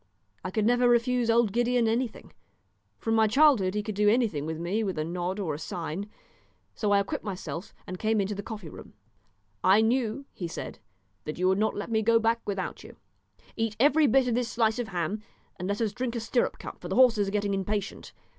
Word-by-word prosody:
I 185 Hz, -, -3 dB
could 210 Hz, +2 st, 0 dB
never 245 Hz, +1 st, +4 dB
refuse 240 Hz, 0 st, +2 dB
old 230 Hz, -2 st, +3 dB
Gideon 240 Hz, 0 st, +2 dB
anything; 230 Hz, +1 st, -2 dB, 0.6 s
from 225 Hz, -, -2 dB
my 220 Hz, -1 st, +4 dB
childhood 225 Hz, -6 st, +4 dB
he 210 Hz, -, -1 dB
could 215 Hz, -, -4 dB
do 205 Hz, +1 st, +3 dB
anything 210 Hz, -, +1 dB
with 160 Hz, 0 st, -3 dB
me 180 Hz, +7 st, -1 dB
with 190 Hz, -5 st, -3 dB
a 155 Hz, -, 0 dB
nod 180 Hz, +4 st, -3 dB
or 170 Hz, -7 st, -2 dB
a 145 Hz, -, -5 dB
sign; 175 Hz, +4 st, -5 dB, 0.6 s
so 210 Hz, -, -1 dB
I 200 Hz, 0 st, +5 dB
equipped 200 Hz, -1 st, -3 dB
myself 185 Hz, -2 st, -6 dB
and 185 Hz, -1 st, -7 dB
came 220 Hz, 0 st, +1 dB
into 200 Hz, +1 st, -1 dB
the 200 Hz, -, -5 dB
coffee 210 Hz, -4 st, -7 dB
room. -, -, -12 dB, 0.7 s
"I 195 Hz, +4 st, +6 dB
knew," 240 Hz, +3 st, 0 dB
he 175 Hz, -, -5 dB
said, -, -, -7 dB, 0.5 s
"that 150 Hz, -, -5 dB
you 185 Hz, +1 st, +1 dB
would 190 Hz, +1 st, +2 dB
not 220 Hz, -, +1 dB
let 205 Hz, -, -5 dB
me 220 Hz, -1 st, +2 dB
go 230 Hz, +1 st, +4 dB
back 230 Hz, +1 st, +1 dB
without 195 Hz, -2 st, -4 dB
you. -, -, -12 dB, 0.6 s
Eat 225 Hz, -2 st, -1 dB
every 290 Hz, +3 st, +5 dB
bit 265 Hz, -1 st, +3 dB
of 240 Hz, -, +1 dB
this 240 Hz, 0 st, 0 dB
slice 225 Hz, 0 st, +1 dB
of 240 Hz, -, -2 dB
ham, 190 Hz, +2 st, -2 dB, 0.4 s
and 180 Hz, -, -4 dB
let 200 Hz, +1 st, -1 dB
us 220 Hz, -3 st, 0 dB
drink 245 Hz, +1 st, -3 dB
a -, -, -1 dB
stirrup 230 Hz, +2 st, 0 dB
cup, -, -, -9 dB
for -, -, -6 dB
the -, -, -2 dB
horses 230 Hz, -6 st, +5 dB
are -, -, -2 dB
getting 205 Hz, -1 st, 0 dB
impatient. 195 Hz, +1 st, -3 dB
215 Hz, 220 wpm, -28 LUFS, 195-235 Hz, 0.7 s, I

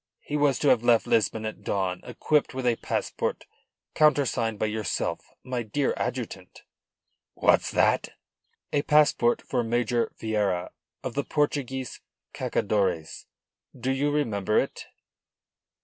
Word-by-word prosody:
He 150 Hz, -, -5 dB
was 145 Hz, -3 st, +3 dB
to 145 Hz, -, +2 dB
have 120 Hz, -, +5 dB
left 120 Hz, -1 st, +4 dB
Lisbon 110 Hz, -2 st, +1 dB
at 110 Hz, -, -5 dB
dawn 95 Hz, -2 st, -1 dB
equipped 150 Hz, -3 st, 0 dB
with 130 Hz, -1 st, -3 dB
a 120 Hz, -1 st, +3 dB
passport -, -, -2 dB, 0.5 s
countersigned 135 Hz, -7 st, +2 dB
by 110 Hz, -, 0 dB
yourself, 110 Hz, 0 st, -2 dB
my 125 Hz, -1 st, -2 dB
dear 125 Hz, +5 st, 0 dB
adjutant." 105 Hz, -7 st, -5 dB, 0.7 s
"What's -, -, +3 dB
that?" -, -, +2 dB, 0.6 s
"A 145 Hz, -, +3 dB
passport 145 Hz, -6 st, +3 dB
for 125 Hz, -2 st, -1 dB
Major 120 Hz, 0 st, 0 dB
Vieira 105 Hz, -5 st, -1 dB, 0.3 s
of 130 Hz, -, -4 dB
the 140 Hz, -, -1 dB
Portuguese 135 Hz, -4 st, -2 dB, 0.3 s
Cacadores. 95 Hz, -6 st, -1 dB, 0.5 s
Do 130 Hz, -, 0 dB
you 140 Hz, +2 st, +1 dB
remember 110 Hz, -9 st, 0 dB
it?" -, -, -1 dB
120 Hz, 125 wpm, -26 LUFS, 110-140 Hz, 0.7 s, have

